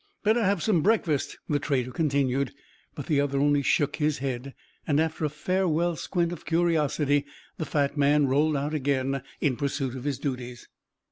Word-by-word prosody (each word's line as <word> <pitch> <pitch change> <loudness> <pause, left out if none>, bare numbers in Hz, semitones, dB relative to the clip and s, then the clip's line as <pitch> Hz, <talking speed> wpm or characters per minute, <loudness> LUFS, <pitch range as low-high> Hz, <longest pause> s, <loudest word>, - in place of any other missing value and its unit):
"Better 220 +2 +3
have 195 -3 +1
some 195 -7 +3
breakfast," 170 -8 +1
the 145 - +1
trader 130 -4 -1
continued; 140 -4 0 0.4
but - - -6
the 145 -3 +2
other 140 -1 -1
only 145 0 +3
shook 145 +1 +1
his 150 -1 +1
head. 130 0 -4 0.3
And 145 -1 +2
after 160 0 0
a - - 0
farewell 175 +1 0
squint 175 0 -1
of 170 -2 -7
curiosity, 150 -4 +1 0.3
the 160 - -1
fat 145 -1 0
man 145 +1 +4
rolled 145 +3 +2
out 145 +2 -2
again 135 -2 0 0.2
in 135 -5 +1
pursuit 135 -2 -2
of 130 +1 -7
his 145 -3 -1
duties. 125 -3 -5
145 Hz, 175 wpm, -27 LUFS, 140-160 Hz, 0.4 s, man